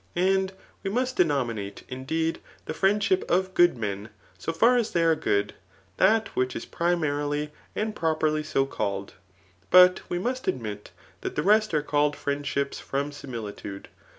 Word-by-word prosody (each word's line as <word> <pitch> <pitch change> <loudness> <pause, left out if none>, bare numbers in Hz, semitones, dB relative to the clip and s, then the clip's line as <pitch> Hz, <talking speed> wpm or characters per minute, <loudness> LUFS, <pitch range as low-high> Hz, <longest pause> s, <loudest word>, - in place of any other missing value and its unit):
And 190 +1 +2 0.3
}P7e 195 - -2
must 255 +2 0
denominate, 120 - 0
indeed, 160 +6 -2 0.3
the - - -4
friendship 195 +1 +2
of 185 +1 +1
good 175 -7 +5
men 105 -1 -4 0.3
so 95 - -3
far 230 +10 +4
as 235 -3 +1
they 170 - +1
are 165 -1 +5
good, 100 -9 0 0.4
that 220 +3 +4
which 130 0 0
is - - -5
primarily 150 -3 -1 0.2
and 215 0 -2
pro 160 -1 +1
perly 155 0 +1
80 150 -3 0
called; 100 -2 -3 0.6
but 180 0 +8
we 175 - -1
must 250 +7 -3
admit 105 -5 -3 0.3
that - - -4
the - - 0
rest 215 +2 +4
are 150 - +1
called 145 0 +1
friendships 140 -1 -2
from 140 +2 -2
similitude. 110 -8 -7
155 Hz, 155 wpm, -26 LUFS, 130-185 Hz, 0.6 s, but